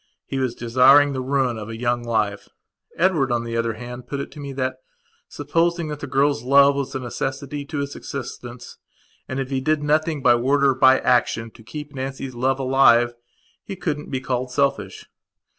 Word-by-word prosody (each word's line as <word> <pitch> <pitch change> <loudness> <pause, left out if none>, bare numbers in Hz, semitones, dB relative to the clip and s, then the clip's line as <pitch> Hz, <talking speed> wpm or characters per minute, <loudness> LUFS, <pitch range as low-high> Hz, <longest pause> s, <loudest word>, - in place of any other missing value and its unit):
He 135 - -4
was 130 -2 -1
desiring 135 +4 +5
the 130 - -3
ruin 130 -3 0
of 105 0 -7
a 115 - -6
young 120 0 -1
life. 110 -4 -1 0.5
Edward 165 -8 +2
on 120 -1 0
the 115 0 -5
other 115 -1 0
hand 125 +2 -9
put 140 - -4
it 140 - -6
to 150 - -12
me 140 -1 -6
that, 130 -1 -2 0.5
supposing 165 +3 -1
that 150 -1 -5
the - - -6
girl's 140 -2 +1
love 140 +3 +5
was 140 -1 -4
a - - -1
necessity 135 +3 -4
to 150 +1 -6
his 140 0 -3
existence, 120 -4 -8 0.5
and, 130 - -4
if 135 0 -4
he 135 -1 -1
did 155 +2 0
nothing 155 -1 0
by 120 - +6
word 135 +4 +1
or 135 -1 +5
by 130 0 +5
action 115 -2 +1
to 115 - -17
keep 150 +6 -8
Nancy's 135 0 -5
love 130 +3 0
alive, 130 -3 +4 0.5
he 195 - -7
couldn't 150 -5 -4
be 130 - -2
called 130 0 -2
selfish. 125 -8 -1
130 Hz, 195 wpm, -22 LUFS, 120-140 Hz, 0.5 s, by